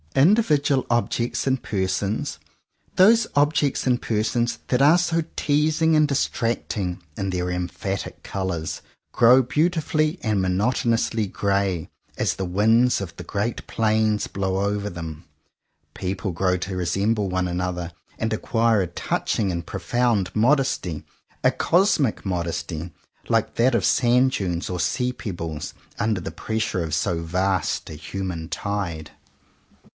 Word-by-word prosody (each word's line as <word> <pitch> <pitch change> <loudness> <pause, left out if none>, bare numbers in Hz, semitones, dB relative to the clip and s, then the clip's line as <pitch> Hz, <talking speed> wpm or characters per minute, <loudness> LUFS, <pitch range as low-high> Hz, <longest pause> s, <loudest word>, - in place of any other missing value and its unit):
Individual 145 - +3
objects 120 +1 0
and 130 -1 +1
persons, 100 +1 -1 0.6
those 220 +4 +6
objects 145 -1 +2
and 125 -1 +2
persons 115 +2 0
that 125 0 +1
are 150 +5 +7
so 170 -2 +1
teasing 155 +2 +2
and 155 0 +5
distracting 115 -9 -1
in 95 -1 -2
their 90 -1 -1
emphatic 90 +2 -4
colours, 95 -5 -3 0.3
grow 125 +3 +6
beautifully 155 +3 +1
and 105 -4 +1
monotonously 110 +3 +1
grey 100 -4 0 0.3
as - - 0
the 95 - -3
winds 110 +7 +3
of 90 -4 -6
the 90 - -8
great 105 +6 -3
plains 110 -1 +1
blow 100 +1 -1
upon 105 0 -3
them. 80 -3 -7 0.7
People 95 +1 -3
grow 90 +2 +1
to 95 +1 -4
resemble 100 +4 0
one 90 0 0
another 90 -1 -3 0.2
and 110 0 -1
acquire 115 -1 +2
a 90 - -1
touching 95 +3 -1
and 85 -1 -4
profound 120 -6 0
modesty, 115 - +1 0.4
a - - +5
cosmic 170 - +2
modesty, 85 -2 -3 0.4
like - - +1
that 120 +1 +3
of 100 - +1
sand 125 +1 +4
dunes 90 -8 -2
or 90 -1 -3
sea 125 +7 0
pebbles, 85 -10 -5 0.3
under 110 -3 +1
the 85 - -6
pressure 110 -5 -2
of 80 -2 -4
so 85 0 0
vast 95 +3 0
a - - -7
human 85 +1 -5
tide. 85 -4 -3
105 Hz, 130 wpm, -23 LUFS, 90-125 Hz, 0.7 s, are